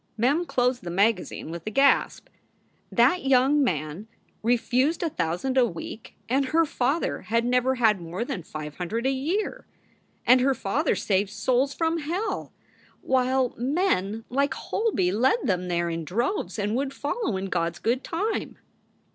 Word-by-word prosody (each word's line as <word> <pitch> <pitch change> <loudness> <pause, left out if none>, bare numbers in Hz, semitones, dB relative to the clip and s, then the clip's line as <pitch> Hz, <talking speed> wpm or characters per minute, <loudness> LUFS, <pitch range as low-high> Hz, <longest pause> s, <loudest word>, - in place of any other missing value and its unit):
Mem 280 +10 +2
closed 250 -3 +1
the 175 - -6
magazine 195 -2 0
with 170 0 -6
a - - +1
gasp. 275 +6 +2 0.6
That 260 +10 +3
young 270 +2 +4
man 155 - -2 0.3
refused 250 +7 +1
a 330 - -1
thousand 180 +10 0
a 250 - +5
week! 190 +4 -8
and 270 +4 +1
her 325 +5 +3
father 280 +2 -1
had 230 +2 0
never 250 +1 +2
had 220 -6 +3
more 175 +7 -4
than 185 - -4
five 155 -2 -8
hundred 215 +7 -3
a 265 - +3
year. 320 +11 -2 0.6
And 255 0 +6
her 270 +1 +2
father 270 +9 0
saved 195 0 0
souls 255 +6 0
from 330 0 0
hell, 345 +8 -3 0.5
while 260 -1 +1
men 235 - 0
like 275 +1 0
Holby 410 - 0
led 250 - +3
them 180 -4 0
there 175 -1 0
in 165 0 -3
droves 235 - -2
and 210 +1 -1
would 275 +1 -2
follow 290 - -2
in 190 - -3
God 170 -3 -1
s - - -13
good 245 +4 0
time. 410 +7 -2
245 Hz, 160 wpm, -26 LUFS, 195-275 Hz, 0.6 s, And